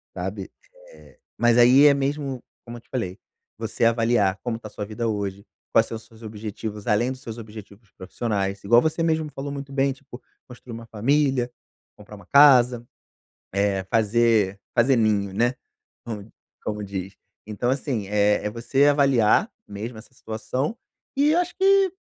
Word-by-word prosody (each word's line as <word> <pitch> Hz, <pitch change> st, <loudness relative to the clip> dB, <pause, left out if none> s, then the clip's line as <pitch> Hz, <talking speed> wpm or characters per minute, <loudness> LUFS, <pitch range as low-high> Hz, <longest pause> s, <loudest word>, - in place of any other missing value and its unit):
sabe. -, -, -5 dB, 0.4 s
Eh, -, -, -18 dB, 0.2 s
mas 120 Hz, 0 st, +3 dB
aí 125 Hz, +4 st, +7 dB
é 140 Hz, -, +6 dB
mesmo, 140 Hz, -2 st, -2 dB, 0.2 s
como 120 Hz, 0 st, -8 dB
eu 120 Hz, -, -13 dB
te -, -, -35 dB
falei, 95 Hz, -6 st, -4 dB, 0.4 s
você 115 Hz, +1 st, -1 dB
avaliar 115 Hz, -4 st, +2 dB
como 120 Hz, -2 st, -2 dB
tá 110 Hz, -, -9 dB
a -, -, -13 dB
sua 105 Hz, -, -5 dB
vida 110 Hz, +2 st, -3 dB
hoje, 100 Hz, -1 st, -3 dB, 0.3 s
quais 115 Hz, -, +4 dB
são 115 Hz, -, -6 dB
os 110 Hz, -, -13 dB
seus 110 Hz, 0 st, -19 dB
objetivos, 105 Hz, -1 st, -7 dB
além 115 Hz, +4 st, +2 dB
dos 130 Hz, 0 st, -8 dB
seus 115 Hz, -2 st, -8 dB
objetivos 105 Hz, -1 st, -12 dB
profissionais, 100 Hz, 0 st, -3 dB
igual 120 Hz, +4 st, +5 dB
você 160 Hz, +1 st, -1 dB
mesmo 160 Hz, -1 st, +1 dB
me 150 Hz, -, -9 dB
falou 140 Hz, +1 st, -6 dB
muito 140 Hz, 0 st, -7 dB
bem, 135 Hz, 0 st, +2 dB
tipo, 135 Hz, -2 st, -13 dB, 0.3 s
construir 125 Hz, -1 st, -12 dB
uma 115 Hz, 0 st, -8 dB
família, 130 Hz, +2 st, +1 dB, 0.5 s
comprar 105 Hz, 0 st, -12 dB
uma 100 Hz, -, -14 dB
casa, 125 Hz, -4 st, +6 dB, 0.7 s
eh, 100 Hz, -1 st, 0 dB
fazer 110 Hz, -3 st, +2 dB, 0.2 s
fazer 125 Hz, +2 st, +4 dB
ninho, 105 Hz, -3 st, +1 dB
né, 120 Hz, +4 st, +1 dB, 0.5 s
com 110 Hz, -2 st, -7 dB, 0.3 s
como 105 Hz, -1 st, -4 dB
diz. 95 Hz, -1 st, -6 dB, 0.3 s
Então 110 Hz, +4 st, -2 dB
assim, 130 Hz, -7 st, -2 dB
eh, 105 Hz, 0 st, +2 dB
é -, -, 0 dB
você 120 Hz, +5 st, +1 dB
avaliar 140 Hz, -, +3 dB, 0.2 s
mesmo 110 Hz, +3 st, -7 dB
essa 115 Hz, +3 st, -14 dB
situação, 125 Hz, -, -4 dB, 0.4 s
e 295 Hz, +2 st, +4 dB
acho 355 Hz, 0 st, 0 dB
que 390 Hz, 0 st, +4 dB
115 Hz, 170 wpm, -24 LUFS, 105-135 Hz, 0.7 s, aí